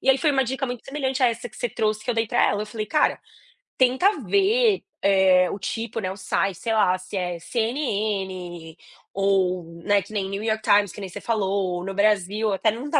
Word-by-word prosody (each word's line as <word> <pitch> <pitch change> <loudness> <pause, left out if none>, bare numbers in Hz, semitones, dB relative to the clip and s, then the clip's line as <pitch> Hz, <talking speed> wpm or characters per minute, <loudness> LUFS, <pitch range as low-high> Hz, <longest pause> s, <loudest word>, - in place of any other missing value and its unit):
E - - -4
aí 265 - +4
foi 305 - +2
uma 270 -2 +2
dica 265 +2 -2
muito 245 -2 -6
semelhante 270 -1 -2
a - - +7
essa 235 +1 -4
que 220 - -17
você 245 - -2
trouxe 215 0 -1
que 245 - -1
eu - - -1
dei 225 0 +1
para - - +1
ela. 205 - -1
Eu - - -6
falei: 215 0 -5
"Cara, 305 +5 +1 0.6
tenta 260 +11 +3
ver, 415 +1 +3 0.3
eh, 185 -1 +5
o 200 - -5
tipo, 230 +3 -4
né, 185 -4 -2
o 190 - -8
site, 195 0 -1
sei 225 - -2
lá, 185 -4 +3
se 185 +2 -9
é 180 -2 -2
CNN, 195 - -3 0.4
ou, 190 -2 +1 0.2
né, 205 -1 +3
que 200 - -13
nem 200 -2 -1
New 195 +2 -4
York 220 -1 -1
Times, 205 -3 +4
que - - -11
nem 195 - -6
você - - -8
falou. 195 -5 -1
No 195 - -4
Brasil" 210 +1 +1
até 215 +3 +2
não 245 +7 -6
tá 295 - +3
215 Hz, 225 wpm, -24 LUFS, 190-245 Hz, 0.6 s, a